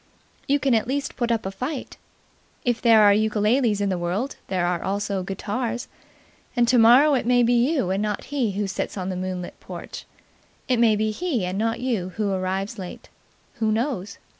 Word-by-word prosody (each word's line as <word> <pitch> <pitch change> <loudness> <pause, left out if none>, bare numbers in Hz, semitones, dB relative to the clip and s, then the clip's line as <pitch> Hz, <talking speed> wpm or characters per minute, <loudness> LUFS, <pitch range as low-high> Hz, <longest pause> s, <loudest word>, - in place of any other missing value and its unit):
You 280 - +3
can 275 -3 +1
at 225 0 +2
least 275 +2 -2
put 240 -1 -1
up 225 -3 0
a 190 - -2
fight. 255 +8 -5 0.7
If 240 -2 0
there 225 -3 +6
are 205 -1 +7
ukuleles 215 +1 +2
in 200 - +1
the 185 -2 -1
world, 190 +11 -2
there 180 -2 0
are 175 -1 0
also 200 0 -1
guitars, 220 +6 -3 0.7
and 240 -1 +3
tomorrow 250 +5 +6
it 250 -3 0
may 245 0 +4
be 240 +1 +3
you 245 - +2
and 195 +2 0
not 210 -1 -2
he 240 -8 0
who 205 +1 -1
sits 195 - -4
on 185 0 -3
the 185 - -3
moonlit 185 -1 -5
porch; - - -9 0.6
it 255 - +2
may 225 -2 +5
be 215 +1 0
he 250 - -1
and 185 +2 -3
not 225 +2 -1
you 210 -8 -2
who 210 -2 -1
arrives 190 +3 -2
late. 180 -2 -8 0.5
Who 220 -2 +1
knows? 220 -4 -2
215 Hz, 190 wpm, -24 LUFS, 195-245 Hz, 0.7 s, are